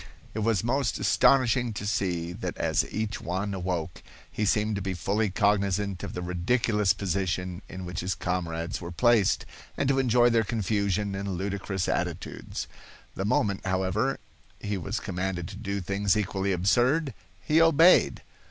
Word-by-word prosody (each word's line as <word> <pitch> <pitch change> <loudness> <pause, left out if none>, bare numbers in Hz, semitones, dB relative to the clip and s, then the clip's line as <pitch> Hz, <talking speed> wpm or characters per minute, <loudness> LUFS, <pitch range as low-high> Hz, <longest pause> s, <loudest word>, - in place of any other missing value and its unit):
It 110 - -3
was 110 -3 +1
most 125 0 0
astonishing 125 -2 +3
to 105 - -5
see 90 -4 -1
that - - -5
as - - 0
each 110 -1 -3
one 95 +4 -2
awoke, 90 -3 -3 0.3
he 105 - -1
seemed 105 +1 +1
to - - -3
be 95 -1 -3
fully 100 +6 0
cognizant 100 -1 +1
of - - -6
the 90 - -4
ridiculous 105 +3 +1
position 90 -2 -2
in 95 -1 -7
which 90 -1 -5
his 95 +2 -2
comrades 85 -2 -3
were 85 0 -6
placed, 115 +1 +3 0.3
and 140 - 0
to 135 -1 +3
enjoy 120 -2 +4
their 115 -1 +3
confusion 100 -2 -1
and 95 -1 -3
ludicrous 95 0 -2
attitudes. - - -3 0.5
The 95 - -3
moment, 100 -1 +1
however, 95 +7 0 0.4
he 105 0 -3
was 95 +3 -3
commanded 90 -2 -3
to 100 - -8
do 100 -1 -3
things 100 +2 +1
equally 100 -1 -1
absurd, 125 - +2 0.3
he 155 +2 +3
obeyed. 165 +2 +5
100 Hz, 155 wpm, -27 LUFS, 95-110 Hz, 0.5 s, obeyed